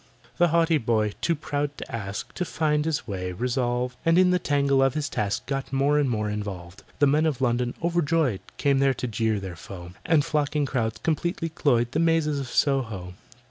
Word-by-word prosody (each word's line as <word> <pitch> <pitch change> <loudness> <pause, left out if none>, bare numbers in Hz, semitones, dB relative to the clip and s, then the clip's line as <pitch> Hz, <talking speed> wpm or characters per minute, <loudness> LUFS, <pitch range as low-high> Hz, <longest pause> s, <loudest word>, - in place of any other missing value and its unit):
The 175 - +6
haughty 165 -1 +3
boy, 110 -3 +1
too 170 - +1
proud 145 -1 -3
to - - -6
ask, 100 -3 -5
To 180 - -2
find 150 -3 0
his 160 -5 -1
way 90 -3 -4
resolved, 125 +3 -1
And 165 +1 +4
in 185 0 +5
the 180 - +3
tangle 140 -4 +2
of 135 -1 +2
his 155 -1 -1
task 100 -6 -2
Got 135 -1 -3
more 140 +2 +2
and 140 -3 +1
more 105 -3 -1
involved. 100 -4 -5 0.2
The 145 - +4
Men 150 +3 +3
of 145 -5 -1
London, 120 -1 0
overjoyed, 165 - +1 0.2
Came 140 -2 +2
there 135 -1 +3
to - - -4
jeer 110 -2 0
their 95 -2 -6
foe, 90 0 -9
And 160 -4 +3
flocking 150 -1 0
crowds 115 -5 -1
completely 165 +1 -1
cloyed 120 -7 +1
The 150 - 0
mazes 165 -3 +2
of 135 - -4
Soho. 115 -12 0
135 Hz, 195 wpm, -25 LUFS, 110-155 Hz, 0.2 s, The